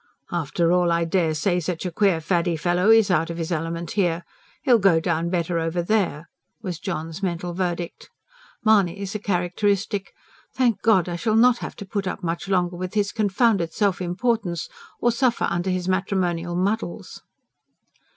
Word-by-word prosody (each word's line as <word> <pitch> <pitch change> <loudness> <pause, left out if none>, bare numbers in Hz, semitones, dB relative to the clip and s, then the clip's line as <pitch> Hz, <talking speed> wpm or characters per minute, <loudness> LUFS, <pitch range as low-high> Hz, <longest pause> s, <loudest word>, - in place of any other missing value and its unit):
"After 170 0 0
all 180 -1 +3
I 170 0 +2
dare 165 -2 +1
say 175 +4 +1
such 175 +1 -4
a 180 - -2
queer 190 -1 +2
faddy 170 +1 +1
fellow 175 +5 +1
IS 225 -3 +6
out 165 -2 +2
of 170 - -5
his 165 0 -3
element 165 0 -3
here. 175 -4 0 0.4
He'll 245 -3 +5
go 185 -5 +4
down 170 0 -1
better 170 -1 0
over 165 +1 -1
there," 175 -5 0 0.3
was 185 -7 -5
John's 160 +3 -5
mental 175 -2 -2
verdict. 175 -1 -3 0.6
Mahony's, 200 -2 +2
a 210 - -3
characteristic: 195 +1 -1 0.4
"Thank 245 -5 +2
God, 200 -6 +3
I 175 -1 -3
shall 215 +5 0
not 240 +1 +5
have - - -6
to 200 - -8
put 195 0 -3
up 190 - -4
much 170 +2 -3
longer 180 -2 0
with 185 +2 -5
his 205 -1 +1
confounded 205 -4 +1
self 200 -3 +1
importance, 180 -1 -1 0.3
or 240 - +3
suffer 240 0 +1
under 175 +2 -1
his 185 -1 -1
matrimonial 185 -3 -1
muddles!" 195 +1 -2
180 Hz, 170 wpm, -23 LUFS, 170-200 Hz, 0.6 s, IS